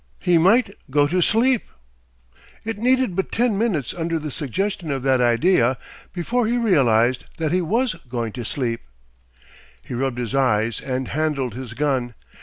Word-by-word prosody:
He 175 -2 +3
might 200 +5 +4 0.2
go 145 +2 +3
to 180 +4 +1
sleep! 235 +6 +3 1.0
It 225 -2 -4
needed 255 -4 +2
but 190 - -2
ten 235 -2 +1
minutes 195 - -1
under 165 -1 -2
the 155 -2 -5
suggestion 170 - -3
of 135 -2 -2
that 130 -2 +3
idea, 120 +1 +3 0.3
before 230 +7 -1
he 240 +2 +1
realised 130 - +3
that 160 -2 -1
he 180 +1 +2
was 230 +8 0 0.2
going 120 -2 -3
to 120 - -6
sleep! 115 0 -2 1.0
He - - -7
rubbed 130 0 -1
his 120 0 -3
eyes 115 -4 +1
and 130 -1 -3
handled 145 -5 -1
his 120 -1 -7
gun. 130 -5 -1
150 Hz, 160 wpm, -22 LUFS, 125-195 Hz, 1.0 s, might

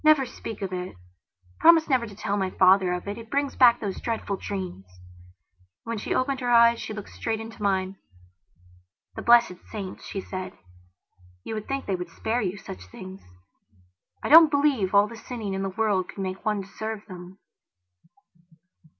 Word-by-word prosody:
"Never 305 -3 +5
speak 225 -3 -8
of 190 -1 -4
it. 180 - -5 0.6
Promise 330 -1 +6
never 255 -4 +1
to 205 - -11
tell 205 0 -2
my 190 -2 0
father 185 0 +4
of 180 +2 -4
it. 205 +3 -4
It 225 -1 -11
brings 280 +1 -1
back 240 -2 +6
those 200 -3 -4
dreadful 225 -3 -2
dreams..." 185 - -6
And, 90 0 -23
when 230 0 -4
she - - -2
opened 265 +1 0
her 245 -2 -2
eyes 235 -1 +6
she - - -6
looked 210 -2 -7
straight 220 -1 -3
into 225 0 -9
mine. 190 -1 0 1.2
"The - - -5
blessed 235 -7 +4
saints," 195 -4 -6
she 195 - -4
said, 185 -1 -6 0.9
"you - - -5
would 215 -1 -5
think 275 0 -3
they 195 - -1
would 180 -1 -6
spare 225 +8 -2
you 195 -1 -2
such 95 - -10
things. 185 - -10 1.0
I - - -2
don't 320 +1 +9
believe 280 -10 +1
all 200 +1 +6
the 230 - -10
sinning 225 -3 -6
in 190 - -2
the 195 - -2
world 200 -2 0
could - - -11
make 185 0 -5
one 210 -2 0
deserve 215 +2 -6
them." 180 -1 -10
205 Hz, 180 wpm, -26 LUFS, 185-235 Hz, 1.2 s, don't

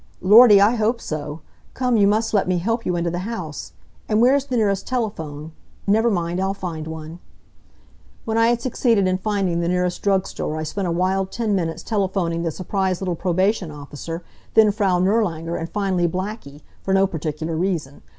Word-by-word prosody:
"Lordy, 210 +2 +8
I 205 +4 +5
hope 225 +2 +1
so! 150 -2 -5 0.3
Come, 250 -2 +1
you 205 -2 +5
must 220 +2 +1
let 200 -3 +2
me 185 -1 +1
help 225 +6 -1
you 180 - 0
into 170 0 -1
the 175 - -3
house. 185 -7 -6 0.4
And 215 0 +2
where 245 +3 +5
is 280 -1 +1
the 255 -3 -2
nearest 200 -3 0
telephone? 160 - -4 0.3
Never 220 +3 +3
mind; 175 -2 -1
I'll 195 +1 -1
find 165 -5 -5
one." 160 +1 -8 1.1
When 225 - -2
I 230 0 +4
had 235 0 +1
succeeded 230 -6 +2
in 185 0 0
finding 195 -4 -1
the 170 - -1
nearest 180 0 0
drug 195 -2 +2
store 155 - -4
I 155 - -3
spent 185 +5 -3
a - - -1
wild 190 +2 0
ten 225 -3 -1
minutes 165 -3 -2
telephoning 190 -5 -1
the 170 - -1
surprised 185 +2 -2
little 185 -2 -2
probation 185 +2 0
officer, 150 +3 -7 0.3
then 220 -2 +6
Frau 195 -3 +1
Nirlanger, 175 -4 0
and 165 - -4
finally 190 -3 0
Blackie, 180 -5 -5 0.2
for 195 - 0
no 195 0 +4
particular 160 -2 -4
reason. 160 -5 -2
185 Hz, 190 wpm, -22 LUFS, 170-210 Hz, 1.1 s, Lordy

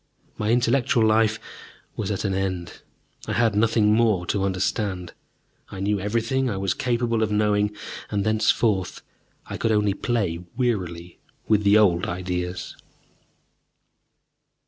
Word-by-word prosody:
My 105 - -2
intellectual 120 -1 +2
life 110 0 +3 0.6
was 105 - -3
at 100 0 -2
an 95 - 0
end. 95 -2 -3 0.5
I - - -2
had 115 -2 +2
nothing 105 0 +3
more 110 -6 +2
to 95 +2 -1
understand. 95 -1 -2 0.6
I 95 - -8
knew 100 +1 0
everything 115 +6 0
I 100 - -3
was 95 -1 0
capable 120 -2 0
of 110 -1 0
knowing, 105 -1 +2 0.4
and, 100 -1 -1
thenceforth, 110 -2 +1 0.4
I - - -6
could 115 - 0
only 105 -2 +2
play 100 -7 -1 0.2
wearily 90 -9 -2 0.3
with 105 -2 +3
the 100 +1 +5
old 90 -5 +3
ideas. 90 0 -4
105 Hz, 130 wpm, -24 LUFS, 95-110 Hz, 0.6 s, the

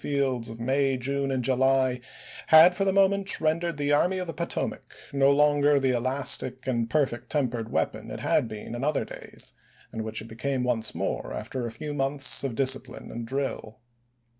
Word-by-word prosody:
fields 130 -5 -1
of 115 0 -9
May, 135 +2 +1
June, 140 +2 -2
and 130 -2 -1
July, 130 0 +2 0.5
had 160 +3 +8
for 195 - -1
the 195 - +3
moment 195 0 +3
rendered 165 +1 0
the 145 0 0
Army 180 +6 +2
of 185 - -3
the 165 - -6
Potomac 170 +3 -3 0.2
no 140 0 +4
longer 145 0 +4
the 135 -1 +1
elastic 130 +1 -1
and 120 -3 -1
perfect 135 -5 -1
tempered 120 -6 -2
weapon - - -2
it - - -6
had - - +1
been 110 +1 -8
in 120 +2 -4
other 150 0 0
days, - - -10 0.4
and 110 - -4
which 110 0 -3
it 110 - -8
became 125 +3 -2
once 120 -3 +1
more - - -3
after 120 +3 -4
a - - -6
few 145 +6 -6
months 140 0 0
of 135 -4 -3
discipline 135 0 -1
and 115 0 -6
drill. 130 -4 -4
135 Hz, 185 wpm, -26 LUFS, 120-145 Hz, 0.5 s, had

